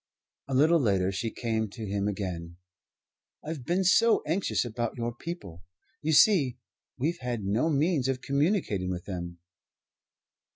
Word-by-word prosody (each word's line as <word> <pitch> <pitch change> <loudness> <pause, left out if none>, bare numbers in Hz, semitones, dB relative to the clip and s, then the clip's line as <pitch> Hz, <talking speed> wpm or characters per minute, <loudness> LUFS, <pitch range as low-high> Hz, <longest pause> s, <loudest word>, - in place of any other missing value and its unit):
A 135 - -2
little 160 +5 +5
later 95 -7 +2
she 105 +4 -2
came 110 -1 -2
to 110 +2 -7
him 100 0 -1
again. 90 -4 -4 0.9
"I've 155 -4 -5
been 175 +8 +1
so 220 +5 +4
anxious 165 -3 0
about 120 0 -3
your 120 0 -2
people 120 - -8 0.4
you 155 0 0
see, 145 - +5 0.4
we've 160 +7 -1
had 120 -4 -3
no 110 +11 +1
means 150 -2 +1
of 135 -1 -1
communicating 140 - 0
with 90 -1 -4
them." 85 -3 -5
120 Hz, 140 wpm, -28 LUFS, 100-155 Hz, 0.9 s, little